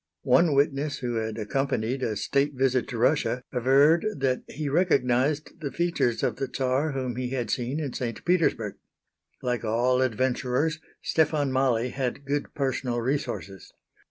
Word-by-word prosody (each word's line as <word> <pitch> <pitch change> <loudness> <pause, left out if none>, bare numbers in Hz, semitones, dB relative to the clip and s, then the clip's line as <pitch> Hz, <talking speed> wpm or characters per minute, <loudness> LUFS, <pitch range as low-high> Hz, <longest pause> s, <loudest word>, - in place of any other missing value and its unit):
One 145 +3 +4
witness 140 +1 +1
who 120 -3 -3
had 110 0 -3
accompanied 130 +1 -1
a 110 -4 -1
state 140 +7 0
visit 130 -1 +1
to 120 - -5
Russia 125 0 +1
averred 135 +6 +4
that 135 -2 0
he 150 0 -5
recognized 145 -2 +1
the 145 -4 -4
features 170 -9 0
of - - 0
the 135 - -3
Czar 135 +3 0
whom 130 -3 -3
he 125 -1 -2
had 120 -5 -2
seen 125 +6 -1
in 145 -5 -3
St. 115 -3 -4
Petersburg. 165 - +1 0.7
Like 125 -1 -1
all 120 +3 +2
adventurers 130 +5 0 0.2
Stefan 150 -3 +1
Mali 130 -2 +1
had 130 +1 -3
good 145 +1 -2
personal 130 -3 -1
resources. 115 - -3
130 Hz, 150 wpm, -26 LUFS, 125-145 Hz, 0.7 s, One